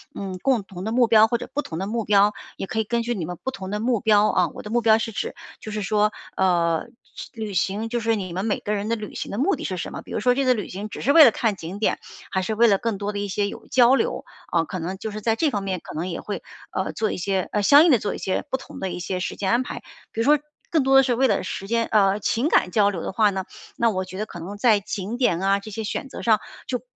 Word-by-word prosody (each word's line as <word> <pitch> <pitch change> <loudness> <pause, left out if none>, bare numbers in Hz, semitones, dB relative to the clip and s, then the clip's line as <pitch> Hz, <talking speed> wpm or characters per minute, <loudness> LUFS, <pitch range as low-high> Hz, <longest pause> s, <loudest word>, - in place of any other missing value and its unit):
嗯， 190 -2 -5
共 255 -6 +2
同 190 0 -8
的 220 - -2
目 245 -1 +4
标， 220 -1 +6
或 235 +1 0
者 245 - -8
不 295 - 0
同 160 - -7
的 190 +3 -3
目 230 0 -2
标， 205 0 +4 0.2
也 195 - -5
可 220 - -2
以 220 - 0
根 235 +2 0
据 240 +1 -1
你 185 -8 -3
们 175 +1 -6
不 265 - -2
同 190 -6 -7
的 210 +1 -3
目 235 -2 +1
标 215 -2 +4
啊 180 -3 +2
我 - - -8
的 210 - -7
目 240 +2 +2
标 220 -1 +5
是 225 0 -3
指， - - -4 0.2
就 215 - -8
是 215 - -2
说， 210 +1 +1 0.2
呃， 170 -3 +2 0.3
去 - - -8
旅 220 -3 -5
行， 200 +5 -1
就 240 0 -1
是 225 0 +1
你 190 -4 -4
们 190 +5 -3
每 215 - 0
个 210 - -3
人 205 +1 -2
的 230 - +1
旅 210 -2 -7
行 - - -5
的 200 - -4
目 335 +10 +2
的 - - -7
是 185 - -2
什 - - -5
么？ - - -6
比 - - -14
如 - - -1
说 250 +2 +4
这 275 -1 +1
次 255 - +5
旅 210 -5 -4
行 200 +3 -5
只 - - -7
是 280 - +2
为 320 0 +10
了 240 - +7
看 220 -1 0
景 180 +2 -7
点， 215 - +1 0.3
还 190 - 0
是 220 - -2
为 235 +2 +5
了 200 -3 +4
更 230 -2 -2
多 205 +1 -2
地 205 0 -3
一 - - -3
些 200 +1 -1
有 - - -8
交 250 +2 +5
流， 485 - -1 0.3
啊， 165 -1 +2
可 185 - -5
能 180 +3 -4
就 220 - -4
是 215 - -6
在 225 +1 +1
这 310 +4 +1
方 205 -5 -2
面 190 -2 -2
可 - - -9
能 165 +3 -2
也 170 - -4
会， 205 - -5 0.3
呃， - - -2
做 220 - -1
一 - - -4
些 190 0 -1
呃， 210 - +1
相 285 +8 +8
应 335 - +5
的 250 - +6
做 205 - -2
一 - - -5
些 190 - -2
不 265 - +1
同 265 - -11
的 190 - -3
一 175 - -5
些 180 +1 -3
时 180 - -3
间 190 -2 -2
安 240 +2 +3
排。 - - -7 0.3
比 225 - -2
如 - - 0
说 295 +2 +6 0.3
更 315 -5 +2
多 270 0 +3
的 270 - +9
是 250 -2 +1
为 265 +3 +3
了 - - +1
时 195 - -5
间 230 +1 +1
呃， 200 -1 +3
情 235 +8 0
感 - - +3
交 205 -2 +4
流 175 -4 -5
的 - - -4
话 215 +1 +3
呢， 190 -1 -3 0.3
那 235 - +3
我 185 -3 -2
觉 185 0 -9
得 215 - -1
可 175 - -9
能 185 +5 -7
在 215 -1 +4
景 200 +2 -5
点 240 -10 +2
啊， 195 +1 +2
这 215 +2 -10
些 220 +2 -4
选 265 +5 -4
择 - - -8
上， 220 -2 +3 0.3
就 250 -2 -2
210 Hz, 330 characters per minute, -23 LUFS, 195-235 Hz, 0.3 s, 为